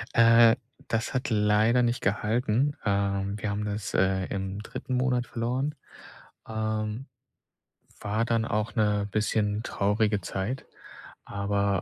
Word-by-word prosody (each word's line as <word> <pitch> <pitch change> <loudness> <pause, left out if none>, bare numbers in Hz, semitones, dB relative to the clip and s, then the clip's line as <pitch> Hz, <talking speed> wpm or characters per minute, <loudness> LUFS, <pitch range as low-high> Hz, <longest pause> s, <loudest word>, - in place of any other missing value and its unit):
Äh, 115 0 +7 0.3
das 115 0 -1
hat 130 +1 -1
leider 110 +3 +3
nicht 120 +1 +1
gehalten, 115 +6 +1
ähm. 100 -1 0
Wir 105 +1 -3
haben 105 +1 -2
das, 105 -1 -4
äh, 95 0 +2
im 95 0 -4
3. 130 +3 -4
Monat 125 -1 +1
verloren, 130 +5 -2 0.7
ähm. 110 +2 -3 0.9
War 105 +2 0
dann 115 -1 +1
auch 110 0 -2
'ne 105 -1 +1
bisschen 105 0 0
traurige 105 0 +1
Zeit, 95 +8 -4 0.6
aber, 100 -1 0
110 Hz, 120 wpm, -27 LUFS, 100-115 Hz, 0.9 s, Äh